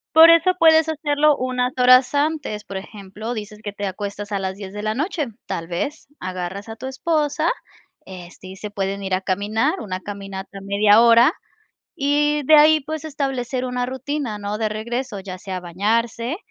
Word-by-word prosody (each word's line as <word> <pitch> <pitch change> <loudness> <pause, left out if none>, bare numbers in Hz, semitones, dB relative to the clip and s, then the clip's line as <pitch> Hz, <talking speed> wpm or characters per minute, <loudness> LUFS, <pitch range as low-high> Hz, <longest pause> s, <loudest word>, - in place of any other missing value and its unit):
Por 325 +1 +10
eso 335 +2 +6
puedes 320 -1 +5
hacerlo 300 -1 +2
unas 255 -1 -1
horas 255 +2 +5
antes, 285 -8 -1
por 195 - -7
ejemplo, 205 +3 -7
dices 210 -2 -7
que 205 -2 -6
te 205 0 -4
acuestas 205 +2 -5
a 200 - -1
las 190 0 -3
10 195 -2 -8
de 210 +1 -6
la 215 0 -1
noche, 305 - -1 0.2
tal 165 0 -4
vez 275 - -4
agarras 185 +3 -5
a 225 - -7
tu 260 - -8
esposa, 300 +3 0 0.6
este, 185 0 -11
y 190 - -9
se 210 +2 -7
pueden 195 -1 -3
ir 190 - -1
a 185 - 0
caminar, 205 +4 0
una 185 -4 -5
caminata 195 0 -7
media 205 +2 +5
hora 235 +4 +6 0.6
y 295 +1 +1
de 310 +1 +7
ahí, 310 +1 +6
pues, 315 +2 -6
establecer 270 -4 -3
una 250 -1 -2
rutina, 265 -3 -4
¿no? 205 +1 -4
De 220 -1 0
regreso, 220 0 -4
ya 185 -1 -8
sea 185 -1 -5
bañarse, 230 - -1
225 Hz, 180 wpm, -21 LUFS, 200-285 Hz, 0.6 s, Por